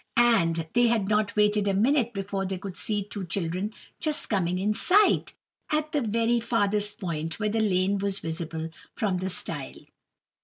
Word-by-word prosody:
And 170 -9 +3
they 240 0 +4
had 225 -4 +1
not 210 -1 0
waited 210 -1 +2
a 195 - +1
minute 240 +3 +2
before 195 -2 -3
they 190 0 -3
could 190 0 -7
see 210 -3 -1
two 200 0 -7
children 185 +3 -3 0.3
just 305 -6 +1
coming 180 -3 0
in 205 +3 0
sight, 400 - +4 0.4
at 305 0 0
the 295 - 0
very 230 +1 +1
farthest 210 -2 0
point 165 -3 -4
where 210 -1 0
the 225 +2 -1
lane 195 -1 +1
was 200 0 -2
visible 160 -1 -5 0.2
from 195 -4 -1
the 190 +1 -3
stile. 155 -5 -1
205 Hz, 170 wpm, -26 LUFS, 185-225 Hz, 0.4 s, they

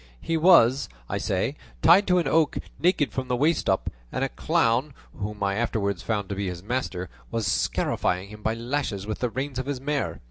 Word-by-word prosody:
He 165 - -2
was, 155 - +5 0.2
I - - -2
say, 100 +8 0 0.3
tied 180 +5 +7
to 180 -1 +4
an 170 -5 +1
oak, 155 +2 +2 0.2
naked 170 -4 +2
from 130 -1 -3
the 125 - +1
waist 150 +6 +1
up, 95 - +1 0.2
and 130 - -1
a 135 - 0
clown, 140 -4 +1 0.2
whom 105 0 -4
I 100 0 +1
afterwards 100 -4 -1
found 105 -3 -2
to 100 - -2
be 100 0 -2
his 90 -1 -5
master, 100 -6 -2 0.2
was 115 -2 -2
scarifying 95 0 0
him 105 0 -11
by 110 +1 0
lashes 115 -4 -2
with 110 0 -4
the 125 - 0
reins 130 +2 -3
of 130 - -4
his 140 -3 -2
mare. 145 +1 -2
125 Hz, 205 wpm, -26 LUFS, 100-145 Hz, 0.3 s, tied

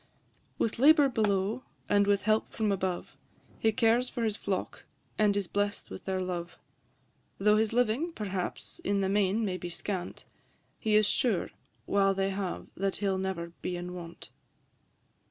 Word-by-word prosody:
With 225 - -1
labour 290 +1 +7
below, 210 0 +1 0.3
and 205 0 +3
with 200 -1 +3
help 215 +1 +2
from 215 -2 0
above, 185 -2 -2 0.4
He 220 - +3
cares 230 +3 +3
for 240 - -3
his 215 -2 0
flock, 195 -3 -3 0.3
and 205 -1 +4
is 200 - 0
bless'd 205 +2 -2
with - - -8
their 190 -1 -1
love: 175 -1 -4 0.8
Though 210 +2 +4
his 220 0 +2
living, 245 +8 +1
perhaps, 195 - -4
in 200 0 0
the 190 - +1
main 205 +2 +2
may 185 -2 -1
be 175 - -6
scant, 180 +1 -4 0.5
He 215 -2 +1
is 215 0 +6
sure, 210 -2 +1 0.3
while 195 -1 +3
they 195 0 0
have, 190 -2 -3
that 195 0 -1
he 205 - -2
'll 190 -1 +1
ne'er 180 -3 -3
be 180 - -2
in 175 +1 -5
want. 170 -1 -9
200 Hz, 165 wpm, -30 LUFS, 190-220 Hz, 0.8 s, labour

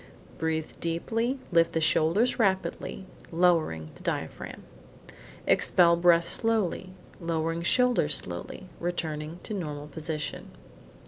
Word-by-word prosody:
Breathe 160 0 -1
deeply, 225 +10 -1
lift 165 -1 +4
the 165 - +2
shoulders 170 +10 +2
rapidly, 190 -2 0 0.3
lowering 165 - +2
the - - -16
diaphragm. - - -4 0.8
Expel 170 -2 +5
breath 170 -1 +4
slowly, 190 -4 0 0.3
lowering 165 -1 -1
shoulders 215 - +3
slowly, 90 - -6
returning 165 -2 -3
to - - -5
normal 150 -7 -4
position. 155 0 -5
170 Hz, 105 wpm, -28 LUFS, 160-185 Hz, 0.8 s, Expel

